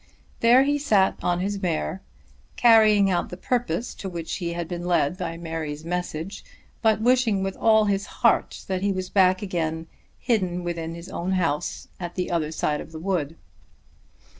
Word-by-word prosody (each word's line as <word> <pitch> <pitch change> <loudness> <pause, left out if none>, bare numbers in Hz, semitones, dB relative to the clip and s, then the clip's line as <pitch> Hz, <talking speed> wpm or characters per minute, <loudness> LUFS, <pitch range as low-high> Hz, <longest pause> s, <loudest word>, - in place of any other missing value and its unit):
There 240 +3 +6
he 290 +1 +1
sat 205 -9 +3
on 175 0 0
his 200 +1 -2
mare, 75 - -2 0.5
carrying 215 -4 +5
out 175 - 0
the 180 - -7
purpose 240 -1 -1
to 195 - -6
which 170 -2 -4
he 170 -2 -3
had 170 -1 -4
been 175 0 -5
led 175 -2 +2
by 180 -3 -4
Mary's 160 -2 -5
message, 175 +1 -4 0.4
but 220 -2 +3
wishing 235 -4 +2
with 195 0 -3
all 220 -1 +4
his 200 0 0
heart - - +1
that 185 -1 -2
he 200 0 +1
was 185 -1 -4
back 185 0 +3
again, 160 -4 -2 0.3
hidden 185 -7 0
within 165 -1 -4
his 170 +1 -9
own 180 +2 -2
house 165 -5 -1
at 175 -1 -6
the 180 -1 -2
other 160 -3 0
side 150 -1 -1
of - - -11
the 160 - -8
wood. 165 -4 -2
180 Hz, 175 wpm, -24 LUFS, 165-205 Hz, 0.5 s, There